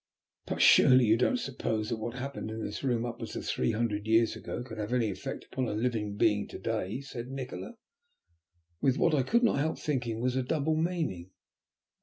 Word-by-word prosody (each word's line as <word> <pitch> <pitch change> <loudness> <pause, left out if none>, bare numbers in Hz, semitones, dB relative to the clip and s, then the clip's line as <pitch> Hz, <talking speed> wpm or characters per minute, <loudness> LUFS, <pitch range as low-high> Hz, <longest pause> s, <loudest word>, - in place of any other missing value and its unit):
"But - - +1
surely 130 -1 +7
you 110 0 +5
don't 125 - +2
suppose 110 - -2
that 115 - -1
what 115 +2 -5
happened 135 -3 -5
in 110 0 -4
this - - -5
room 120 -3 +1
upwards 120 -1 -6
of - - -5
three 65 - 0
hundred 110 -2 -1
years 115 +1 +3
ago - - -5
could 110 -3 -9
have 105 +3 -3
any 115 -4 +2
effect 95 - -6
upon 130 -2 -2
a 105 - -2
living 110 -3 -1
being 105 -1 +2
to - - -8
day?" 110 +1 -2
said 125 -3 -7
Nikola, 135 - -6 1.1
with 135 0 +3
what 165 - +3
I 145 - +4
could 235 - +2
not 230 - +3
help 160 +3 0
thinking 120 -6 -2
was 125 +1 0
a 130 - +2
double 155 +4 0
meaning. 155 - -2
120 Hz, 200 wpm, -30 LUFS, 110-135 Hz, 1.1 s, surely